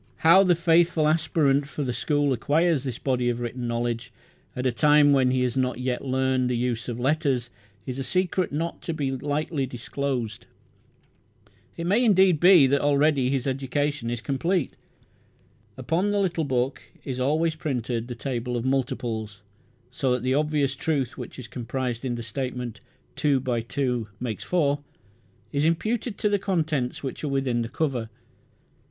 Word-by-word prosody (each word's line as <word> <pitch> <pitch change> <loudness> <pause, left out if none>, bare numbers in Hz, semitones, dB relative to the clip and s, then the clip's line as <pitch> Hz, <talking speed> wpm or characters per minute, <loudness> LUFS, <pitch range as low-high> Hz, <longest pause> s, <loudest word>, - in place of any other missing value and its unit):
How 180 +4 +8
the 180 -2 +4
faithful 165 -1 +3
aspirant 150 -3 +2
for 150 0 -4
the 125 -2 -2
school 145 +2 +1
acquires 150 +4 +1
this 130 -4 -4
body 125 -3 0
of 120 0 -2
written 120 0 -4
knowledge 120 +1 -2 0.4
at 125 - -3
a 130 - +3
time 145 +4 +5
when 130 -2 +4
he 130 0 +1
has 125 -2 -1
not 130 -2 0
yet 125 -1 -2
learned 130 -1 +1
the 125 - 0
use 120 -1 -2
of 120 0 -4
letters 130 -3 0 0.3
is 130 +1 -5
a - - -2
secret 185 +3 0
not 165 +4 -3
to 165 - -4
be 140 -4 -1
lightly 145 +1 -2
disclosed. 125 -2 -4 1.3
It 170 - -3
may 205 +8 +3
indeed 190 -7 +5
be 175 -4 +7
that 140 +1 +2
already 145 -2 +3
his 135 -2 -1
education 135 -1 -1
is 120 -1 -3
complete. 150 - -1 1.0
Upon 180 +5 0
the 205 0 +1
little 175 -5 0
book 130 0 -1 0.2
is 130 -2 -4
always 155 +5 +1
printed 125 -7 -3
the 120 - -6
table 125 -1 -3
of 120 - -3
multiples, 115 -6 -2 0.5
so 130 -2 0
that 125 -1 -2
the 130 0 +1
obvious 145 -2 +1
truth 135 -5 -1
which - - -8
is 130 -3 -8
comprised 125 0 -4
in 125 -2 -2
the 120 - -5
statement, 125 0 -5 0.3
"two 145 -3 +2
by 125 -2 -1
two 125 -1 -2
makes 115 -6 -4
four", 145 -5 +1 0.7
is 145 0 0
imputed 215 +7 0
to - - +1
the 205 -1 +2
contents 155 -11 -1
which 135 +2 -5
are - - -1
within 135 -4 0
the 115 - -3
cover. 125 -5 -2
135 Hz, 170 wpm, -25 LUFS, 125-155 Hz, 1.3 s, How